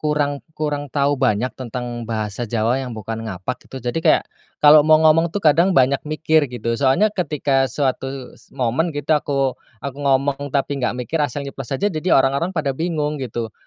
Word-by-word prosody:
kurang 145 -2 0 0.2
kurang 145 -2 -2
tau 145 0 +1
banyak 125 -1 +2
tentang 120 -1 -5
bahasa 110 0 -3
Jawa 115 +3 0
yang 125 -4 -6
bukan 115 +1 -5
ngapak, 95 +6 -6
gitu, 130 - -8
jadi 120 +7 -1
kayak - - +5 0.4
kalau 150 +1 +9
mau 155 +1 +5
ngomong, 165 +2 +5
tuh, 200 +5 -4
kadang 170 +4 +4
banyak 135 +1 +4
mikir, 155 -2 +2
gitu. 115 -1 -3
Soalnya 140 +11 +3
ketika 140 -7 0
suatu 135 0 -1 0.5
momen, 130 +7 0
gitu, 145 0 -2
aku 140 -3 +1 0.3
aku 140 -1 -5
ngomong 140 +1 +1
tapi 140 0 -1
nggak 125 0 -1
mikir, 160 +3 -2
asal 145 0 -2
nyeplos 135 -2 -7
aja, 205 +3 0
jadi 155 +3 -3
orang-orang 140 +7 +1
pada 140 -3 0
bingung, 150 -1 -2
gitu. 115 -3 -4
140 Hz, 175 wpm, -20 LUFS, 125-150 Hz, 0.5 s, kalau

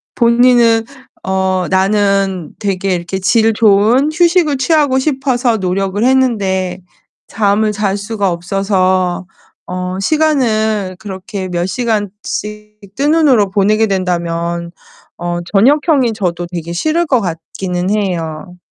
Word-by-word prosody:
본인은 235 -1 +4 0.4
어 190 -1 0
나는 195 -2 +1
되게 195 -2 -1
이렇게 175 +2 -4
질 220 +3 +2
좋은 220 +6 +3
휴식을 340 -3 +2
취하고 280 -1 +2
싶어서 260 -4 0
노력을 195 +2 -1
했는데 200 -8 +1 0.5
잠을 210 +1 +1
잘 205 -1 -1
수가 205 -2 -2
없어서 185 0 0 0.4
어 180 +1 -4
시간을 220 -8 +1
그렇게 195 -1 -6
몇 175 -1 -1
시간씩 210 -1 -4 0.2
뜬 285 +4 +1
눈으로 270 -11 +3
보내게 210 +3 +2
된다면 170 -3 -2 0.5
어 175 0 -3
저녁형이 265 - +3
저도 175 -4 -3
되게 170 -1 -5
싫을 315 - 0
것 260 -4 +2
같기는 180 +1 -4
해요. 180 -4 -3
200 Hz, 240 characters per minute, -15 LUFS, 185-235 Hz, 0.5 s, 본인은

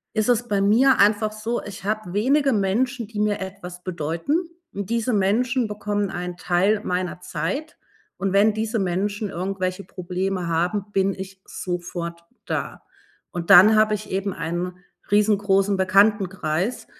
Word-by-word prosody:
ist 215 0 +1
es 240 -1 +2
bei 200 -4 0
mir 240 +7 +4
einfach 210 +1 +3
so, 225 +2 -3
ich 200 -2 -9
habe 215 -3 -2
wenige 275 +7 +2
Menschen, 230 +4 0
die 215 -2 -8
mir 210 -1 +1
etwas 185 -2 -8
bedeuten, 180 - -2 0.2
und 200 -1 -5
diese 235 +1 0
Menschen 235 +5 +1
bekommen 205 -1 -2
einen 180 0 -5
Teil 190 +5 +1
meiner 180 0 -2
Zeit, 180 - -4 0.4
und 195 -1 -2
wenn 205 +2 +4
diese 220 +1 -1
Menschen 200 +3 -1
irgendwelche 185 +1 -3
Probleme 185 0 -3
haben, 175 +5 0
bin 195 0 +1
ich 190 0 -9
sofort 175 -1 -5 0.3
da, - - -4 0.5
und 175 +1 -5
dann 200 +3 +9
habe 215 0 +4
ich 210 0 -6
eben 195 +1 -2
einen 175 +2 -4 0.3
riesengroßen 205 -1 +3
Bekanntenkreis. 190 0 +1
200 Hz, 145 wpm, -23 LUFS, 180-215 Hz, 0.5 s, dann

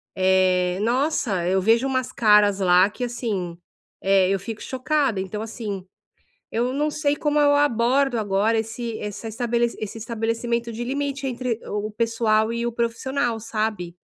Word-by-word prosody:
eh, 185 -1 +2
nossa, 235 - 0
eu 190 +1 +2
vejo 230 +6 +3
umas 260 -2 -1
caras 210 -3 +4
lá 185 +1 +5
que, 245 +4 -4
assim, 205 -8 -3 0.5
eh, 190 -1 +4
eu 195 - +2
fico 215 +3 -7
chocada, 260 -5 0
então 210 +3 -5
assim, 210 -4 -5 0.7
eu 240 +3 0
não 300 +2 0
sei 290 -1 0
como 295 0 0
eu 290 -1 +5
abordo 270 -1 +2
agora 210 +2 +1
esse 225 +1 -3
essa 210 +2 -6
estabelece 235 +1 -1
esse 215 +1 -5
estabelecimento 230 +1 -2
de 235 +2 -5
limite 280 +1 -2
entre 245 -2 -2
o 210 +1 -3
pessoal 225 0 +1
e 235 0 -2
o 240 - -1
profissional, 235 +1 -1
sabe. 215 -6 -3
225 Hz, 155 wpm, -23 LUFS, 205-245 Hz, 0.7 s, lá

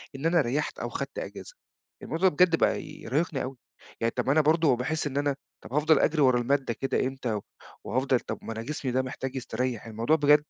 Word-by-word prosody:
إن 135 - -5
أنا 165 0 +4
ريّحت 145 +3 -1
أو - - -3
خدت - - -4
إجازة، - - -8 0.5
الموضوع 185 +3 +2
بجد 170 +2 +4
بقى - - +2
يرهقني 150 0 -2
أوي 130 0 -6 0.4
يعني 115 - +2
طب - - +1
ما - - +4
أنا 155 - +5
برضه 155 -2 +4
باحس 155 +5 -1
إن 140 0 -4
أنا 145 -1 +1 0.3
طب - - -10
هافضل 150 +1 +4
اجري 155 -1 +2
ورا 130 -2 +5
المادة 130 0 +1
كده 135 +3 -1
إمتى 130 -3 -3
و 105 - -3 0.4
وهافضل 130 0 +1
طب - - -6
ما 115 - -5
أنا 110 - -5
جسمي 140 -2 -3
ده 130 +1 +2
محتاج 130 0 -5
يستريّح 125 -2 -2
الموضوع 115 +8 +1
بجد 150 0 +5
140 Hz, 210 wpm, -28 LUFS, 125-155 Hz, 0.5 s, أنا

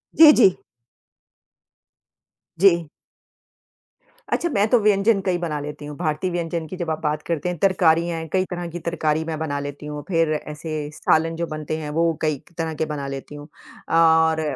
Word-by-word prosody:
जी, 310 -1 +10
जी। 195 -7 +5 2.0
जी। 170 -5 +4 1.4
अच्छा 345 - 0
मैं 205 -6 +2
तो 245 - +5
व्यंजन 205 0 +3
कई 185 -2 0
बना 160 -4 -3
लेती 150 0 -7
हूँ, 150 0 -7
भारतीय 165 +2 -1
व्यंजन 170 -2 -3
की 185 - -7
जब 170 -3 -3
आप 160 0 -2
बात 150 0 -1
करते 170 +1 -1
हैं 175 - -4
तरकारियाँ 170 -3 +3
हैं 160 - -6
कई 185 0 +2
तरह 175 -1 -4
की 175 - -5
तरकारी 160 -2 -1
मैं 160 -1 -3
बना 145 -3 -2
लेती 145 +1 -7
हूँ, 150 0 -6
फिर 165 -4 +1
ऐसे 150 0 -5
सालन 165 +2 +1
जो 170 0 -3
बनते 155 0 -4
हैं 150 -2 -5
वो 165 -1 +3
कई 155 -3 0
क - - -26
तरह 165 -1 -2
के 160 - -2
बना 145 -2 -5
लेती 135 +2 -7
हूँ। 145 0 -10 0.5
और 160 -1 +4
160 Hz, 180 wpm, -22 LUFS, 150-175 Hz, 2.0 s, जी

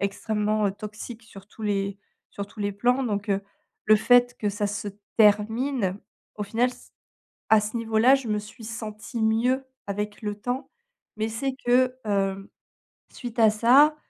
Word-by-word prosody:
extrêmement, 210 +1 0
heu, 195 - 0
toxique 215 +3 -8
sur 200 -3 -14
tous 220 - -13
les 200 -1 -1 0.3
sur 200 0 -5
tous 210 - -19
les 205 0 -1
plans 245 +6 +1
donc 205 -2 -2
heu, 195 0 +1 0.4
le 215 - +6
fait 245 +2 +4
que 210 - 0
ça 205 0 -1
se 210 +1 -4 0.3
termine, 215 0 +3 0.4
au 210 - -3
final 235 +5 +1
c - - -16 0.6
à 220 -1 +7
ce 215 +3 -4
niveau-là 230 +3 +4
je 265 -4 -1
me 210 - +1
suis 210 +3 -10
sentie 220 0 -6
mieux 245 +5 +2 0.2
avec 205 +2 -4
le 210 -1 -2
temps, 250 +6 -4 0.5
mais 220 +1 -1
c'est 260 +4 -2
que, 255 +1 +3
hem, 195 -1 -1 0.6
suite 240 -1 -7
à 220 - +7
ça, 255 +8 +5
215 Hz, 165 wpm, -26 LUFS, 205-245 Hz, 0.6 s, à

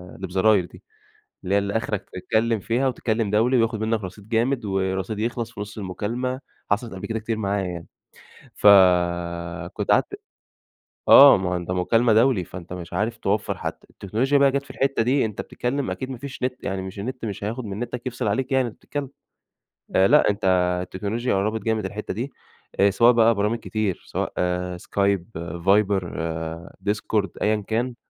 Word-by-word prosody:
اللي 95 - -6
بزراير 95 +1 +3
دي، - - -16 0.6
اللي 95 - 0
هي 100 +1 +1
آخرك 105 -3 -3
تتكلم 110 +4 0
فيها 120 +7 0
وتتكلم 115 -4 -1
دولي 115 +5 +3
وياخد 115 -2 +1
منك 110 0 0
رصيد 100 +3 -9
جامد 120 +2 +1
ورصيد 95 +1 -2
يخلص 115 +1 -2
في - - -8
نص 105 +1 -7
المكالمة، 115 +7 -3 0.3
حصلت 110 +3 0
قبل 95 - -6
كده 115 -1 -2
كتير 115 +1 -3
معايا 100 -2 -1
يعني. 85 -2 -6 0.7
ف - - +2 1.1
كنت - - -2
قعدت - - +1 0.9
آه 140 0 +10
ما 95 -1 -2
هو 90 - -1
أنت 90 0 -4
مكالمة 115 +6 +2
دولي، 115 -3 +4
فأنتَ 90 0 -9
مش 90 -1 -8
عارف 110 +3 -1
توفر 105 -1 -1
حتى. - - -6
التكنولوجيا 120 +9 0
بقى 140 -1 +5
جات 140 +1 -1
في - - -12
الحتة 135 -3 0
دي، 130 +3 +2
أنتَ 105 -2 -4
بتتكلم 135 +3 -3
أكيد 130 - -5
ما 130 - -5
فيش 130 +1 -8
نت 125 0 -2
يعني 95 -1 -2
مش 95 +2 -7
النت 125 +3 -5
مش 100 -2 -5
هياخد 115 +4 -3
من 100 0 -5
نتك 120 +1 -5
يفصل 125 -2 -3
عليك 130 +6 -1
يعني 130 -1 +3
وأنتَ 115 - -9
بتتكلم. 145 -2 -5 0.9
آآ، 95 +1 +6
لأ 150 -1 +5
أنت 105 0 -2 0.4
التكنولوجيا 105 +6 -2
قربت 110 +3 0
جامد 110 -2 0
الحتة 105 +3 -5
دي، 125 +7 -5 0.5
آآ، 100 - +6
سواء 115 +5 +5
بقى 115 0 +4
برامج 105 +3 0
كتير 110 -5 -2
سواء: - - -3 0.4
Discord 100 0 0 0.4
،Viber 100 0 +4 0.9
،Skype. 105 -2 -1
أيًا 105 0 +1
كان. 120 +2 -1
110 Hz, 175 wpm, -23 LUFS, 100-120 Hz, 1.1 s, آه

